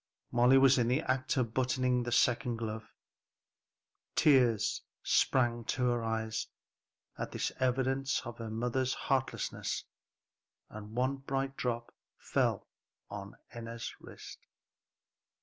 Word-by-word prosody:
Molly 125 +2 +6
was 135 -1 +6
in 120 - +2
the 130 +5 +2
act 130 +2 0
of 115 -3 0
buttoning 125 -1 +1
the 120 0 -3
second 120 +1 +2
glove. 110 -1 -5 1.2
Tears 125 -7 +4 0.2
sprang 120 -2 +2
to 125 - -1
her 120 -1 0
eyes 110 0 -2 0.7
at - - -3
this - - -1
evidence 130 +1 +1
of 120 0 -7
her 115 -1 -5
mother's 125 +3 0
heartlessness, 135 -1 -1 0.9
and 110 +1 -9
one 130 +3 +1
bright 135 0 -2
drop 120 -2 -3 0.2
fell - - 0 0.4
on 100 -1 -7 0.2
Enna's 115 -1 -6
wrist. - - -11
125 Hz, 115 wpm, -32 LUFS, 115-130 Hz, 1.2 s, Molly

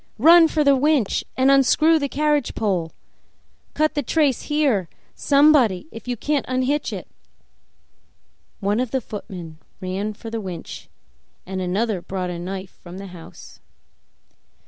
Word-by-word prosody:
Run 330 +7 +7
for 310 -1 0
the 280 -1 +5
winch 275 -5 +1
and 260 +1 +4
unscrew 305 +4 +4
the 280 -1 -2
carriage 295 -2 0
pole! 185 -7 -1 0.8
Cut 310 0 +1
the 290 - -1
trace 290 -5 +1
here, 270 - +1 0.2
somebody, 280 -8 +3
if 225 - -11
you 245 -1 -2
can't 290 +4 0
unhitch 260 +3 -1
it!" - - -6 1.5
One 205 +3 0
of 255 -1 -1
the 265 - 0
footmen 180 -8 -9 0.2
ran 190 +3 -3
for 225 +2 -9
the 225 -1 -3
winch, 180 -4 -8 0.6
and 190 0 -4
another 195 +2 -1
brought 185 -1 -4
a 170 - -5
knife 190 +1 -6
from 175 +1 -10
the 195 - -7
house. 165 -2 -13
230 Hz, 145 wpm, -22 LUFS, 190-290 Hz, 1.5 s, Run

